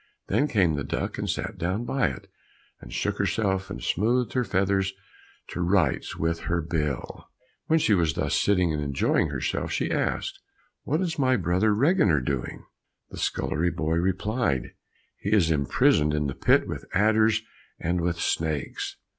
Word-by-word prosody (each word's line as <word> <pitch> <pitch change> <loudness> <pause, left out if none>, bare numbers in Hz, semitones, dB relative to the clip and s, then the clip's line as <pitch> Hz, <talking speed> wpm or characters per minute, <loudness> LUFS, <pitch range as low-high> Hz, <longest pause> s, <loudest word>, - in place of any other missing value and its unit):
Then 145 - +2
came 95 - +2
the 70 -1 -2
duck - - -3
and - - -2
sat - - -3
down 95 +7 -1
by 135 +1 +1
it, 65 - -6 0.5
and - - -12
shook - - -2
herself 95 -3 0
and 65 - -6
smoothed 120 +5 +1
her 125 - +1
feathers 95 -1 +1 0.6
to 90 - -4
rights 85 -6 +1
with 85 0 0
her 85 0 +1
bill. 75 -5 -3 0.4
While 160 - +4
she 130 -9 +3
was 85 -5 +2
thus - - -1
sitting 90 -5 +2
and 75 - -2
enjoying 70 -2 +1
herself, - - -2
she - - -1
asked, - - -1 0.5
"What 155 +5 0
is 165 -4 -2
my 130 -2 +3
brother 95 +4 +2
Reginer 115 - +3
doing?" 65 0 -4 0.5
The - - -8
scullery 85 +3 0
boy 80 -1 -1
replied, 95 - 0 0.5
"He 100 - -3
is 95 -7 +4
imprisoned 75 +1 +3
in 75 0 0
the 70 - -2
pit - - +3
with - - -5
adders 110 +2 +3 0.4
and 85 +1 -1
with 85 0 -1
snakes." 80 -4 -2
90 Hz, 165 wpm, -26 LUFS, 80-110 Hz, 0.6 s, While